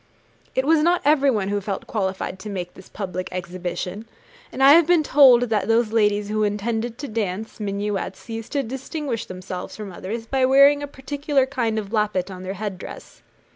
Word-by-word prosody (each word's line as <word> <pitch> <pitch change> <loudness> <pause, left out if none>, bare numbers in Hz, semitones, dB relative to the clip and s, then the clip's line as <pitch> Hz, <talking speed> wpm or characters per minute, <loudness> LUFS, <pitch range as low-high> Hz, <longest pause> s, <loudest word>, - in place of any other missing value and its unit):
It 260 - +1
was 315 +1 +4
not 345 +3 +2
everyone 270 -9 +3
who 205 0 -1
felt 195 -1 -4
qualified 190 -2 -3
to 215 - -7
make 180 -3 -5
this 190 - -15
public 185 -2 -5
exhibition, 180 +3 -5 0.4
and 270 - -1
I 275 - +9
have 325 +1 +7
been 345 -3 +4
told 260 -4 +6
that 220 -4 0
those 225 -1 +2
ladies 210 -2 +2
who 215 +1 -1
intended 220 +3 -2
to 285 - -6
dance 215 -1 -4
minuets, 200 0 -3
used 225 +2 -6
to 280 -1 +1
distinguish 265 0 -4
themselves 185 0 -7
from 210 -3 -7
others 220 +6 -6
by 265 +3 0
wearing 275 +2 +6
a 290 - -4
particular 280 0 -1
kind 240 -5 -1
of 210 0 -4
lappet 205 -4 0
on 185 -1 -8
their 190 +1 -5
head 200 -2 -5
dress. - - -10
220 Hz, 185 wpm, -23 LUFS, 195-265 Hz, 0.4 s, I